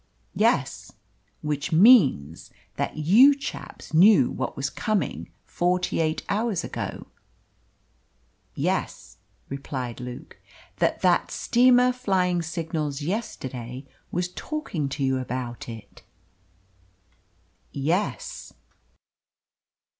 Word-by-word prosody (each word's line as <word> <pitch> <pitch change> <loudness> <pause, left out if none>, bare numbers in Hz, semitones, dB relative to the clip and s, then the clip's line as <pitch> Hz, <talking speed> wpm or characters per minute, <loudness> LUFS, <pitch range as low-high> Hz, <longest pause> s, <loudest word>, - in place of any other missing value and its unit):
"Yes." - - 0 0.5
"Which 150 -2 -2
means 160 - +5 0.3
that - - -3
you 220 - +6
chaps 275 - -8
knew 180 - +6
what 130 - -4
was 135 - -1
coming 215 -3 -2 0.2
forty 180 0 0
eight 155 -1 0
hours 205 -3 -1
ago?" - - -5 1.5
"Yes," - - -3 0.3
replied 130 -3 -5
Luke. 125 0 -9 0.4
"That - - 0
that - - +3
steamer 250 +1 +4
flying 190 -8 0
signals 160 -3 -3
yesterday 130 - -5 0.3
was 180 +1 -1
talking 180 - -4
to 140 - -3
you 130 -1 +1
about 125 -1 -5
it?" 115 -2 -11 1.7
"Yes." 180 - -2
160 Hz, 90 wpm, -25 LUFS, 135-205 Hz, 1.7 s, you